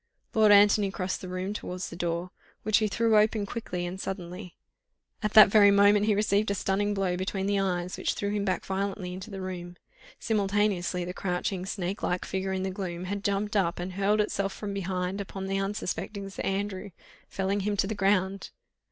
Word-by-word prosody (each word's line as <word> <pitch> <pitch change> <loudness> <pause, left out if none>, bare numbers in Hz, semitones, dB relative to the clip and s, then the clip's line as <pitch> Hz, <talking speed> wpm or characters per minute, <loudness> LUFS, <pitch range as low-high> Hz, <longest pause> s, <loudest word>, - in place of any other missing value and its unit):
Lord 215 -1 +5
Antony 205 0 +6
crossed 185 -1 -3
the 185 - -7
room 185 +2 -3
towards 185 -3 -5
the - - -7
door, 170 +1 -2 0.3
which 215 0 +3
he 215 - +1
threw 225 +1 +2
open 215 -1 +2
quickly 180 -5 -4
and 185 +2 -5
suddenly; 180 -1 -6 0.7
at 210 -1 -1
that 215 -2 +10
very 205 0 +7
moment 205 +1 +5
he 210 - +3
received 210 0 +2
a 200 - 0
stunning 205 +2 0
blow 190 -2 0
between 190 +1 -2
the 200 0 +1
eyes, 180 -2 -1
which - - -1
threw 200 0 -2
him 205 -1 -1
back 185 -3 -1
violently 190 -1 -3
into 185 +3 -8
the 195 -2 -6
room. 180 -1 -6 0.4
Simultaneously 200 -4 0
the 180 - -5
crouching, 180 0 -2
snake 190 0 -3
like 180 0 -1
figure 190 0 -2
in 190 0 -1
the 190 - -2
gloom 180 -3 -5
had 200 +2 -4
jumped 200 +1 -1
up 185 -4 +1
and 180 +1 -5
hurled 200 +3 +2
itself 200 -2 -1
from 205 -2 -5
behind 190 0 -2
upon 195 -1 -6
the 195 0 -1
unsuspecting 200 0 -3
Sir - - -6
Andrew, 195 0 -2 0.4
felling 195 +1 -1
him 205 +1 -1
to 195 - +2
the 210 - -2
ground. 195 -1 +1
195 Hz, 195 wpm, -28 LUFS, 185-205 Hz, 0.7 s, that